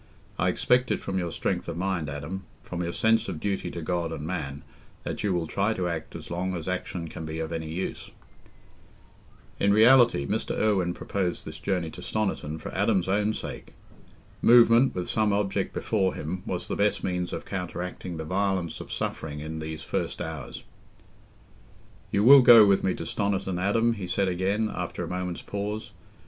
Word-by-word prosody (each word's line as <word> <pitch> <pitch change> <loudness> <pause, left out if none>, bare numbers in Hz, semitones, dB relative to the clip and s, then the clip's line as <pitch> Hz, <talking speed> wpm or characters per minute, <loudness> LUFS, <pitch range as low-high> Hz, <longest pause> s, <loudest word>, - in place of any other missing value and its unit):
I - - +3
expect 125 0 +2
it - - 0
from 95 -1 -2
your 85 -2 -2
strength - - -2
of 85 -1 -4
mind, 90 -4 -1
Adam—from 85 +4 -6
your 85 -1 -2
sense 110 +2 +2
of 85 -5 -4
duty 95 -2 -2
to 85 -1 -6
God 85 0 -1
and 75 -2 -5
man—that 75 -5 -6
you 105 - +1
will 85 -2 0
try 100 +7 0
to 90 -1 -1
act 80 -2 -4
as - - -8
long 90 +2 -2
as 85 -1 -6
action 90 -2 -3
can 80 - -7
be 80 0 -5
of 80 0 -3
any 80 -1 -4
use." 85 +4 -4 1.5
In 100 - +3
reality, 120 - +6
Mr. - - -2
Irwine 95 -5 +1
proposed 90 -3 -2
this - - -8
journey 90 -5 -1
to - - -10
Stoniton 95 -8 -2
for - - -8
Adam's 95 -2 +1
own 105 +3 +1
sake. - - -7 0.7
Movement, 120 +1 +6
with 90 -1 -3
some 110 -1 +1
object 100 -1 0
before 95 -4 0
him, 90 +4 -4
was 90 - -3
the - - -2
best 105 +1 +1
means 90 -1 -2
of - - -5
counteracting 90 -2 -5
the 80 - -5
violence 95 -1 -1
of - - -9
suffering 75 -1 -3
in 80 +1 -5
these 80 0 -5
first - - -3
hours. 80 -5 -6 1.5
"You 100 - +1
will 135 +3 +10
go 115 -3 +9
with 100 -1 +3
me 95 - +1
to - - -5
Stoniton, 95 -3 -1
Adam?" 115 +4 +2
he 100 -5 -5
said 95 +2 +1
again, 95 +4 0
after - - -4
a - - -4
moment's 90 -1 -4
pause. 105 +1 -4
95 Hz, 180 wpm, -27 LUFS, 85-100 Hz, 1.5 s, will